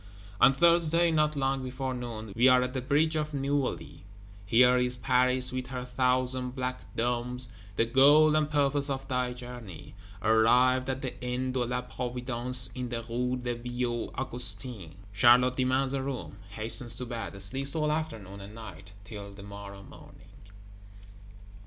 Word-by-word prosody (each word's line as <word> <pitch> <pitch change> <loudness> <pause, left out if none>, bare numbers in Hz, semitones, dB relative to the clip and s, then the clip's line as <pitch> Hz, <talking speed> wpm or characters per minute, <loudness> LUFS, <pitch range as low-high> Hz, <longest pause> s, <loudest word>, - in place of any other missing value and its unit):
On 135 - +7
Thursday, 170 +2 +3
not 155 -1 +1
long 135 -1 -1
before 130 0 -4
noon, 115 -4 -7
we 120 +3 +4
are 125 0 +5
at 125 0 -4
the 130 - -3
bridge 150 +5 +1
of 150 -1 -2
Neuilly; 140 -6 -3 0.4
here 125 +4 +5
is 125 0 0
Paris 125 0 +1
with 130 -1 -4
her 125 -1 -5
thousand 125 0 0
black 125 -1 -5
domes, 125 +1 -2 0.3
the 115 - +2
goal 145 +6 +5
and 155 -1 +1
purpose 145 -1 +1
of 135 0 -4
thy 125 -2 -1
journey! 120 -9 -9 0.3
Arrived 125 +4 +3
at 130 +1 -3
the 130 -1 -6
Inn 125 +1 -2
de 130 - -2
la 125 +1 -2
Providence 125 0 +1
in 125 -1 -5
the 115 -1 -4
Rue 125 +2 -2
des 120 -1 -3
Vieux 120 0 -3
Augustins, 120 - -1 0.2
Charlotte 125 +4 +4
demands 130 +1 +1
a 135 - -1
room; 130 -6 -5
hastens 115 +3 -3
to 125 - -3
bed; 115 -5 -6
sleeps 135 +9 +4
all 150 -1 0
afternoon 110 -11 -5
and 100 +2 -11
night, 100 -3 -11
till 100 -1 -9
the 100 0 -12
morrow 100 -1 -10
morning. - - -16
125 Hz, 160 wpm, -28 LUFS, 120-135 Hz, 0.4 s, On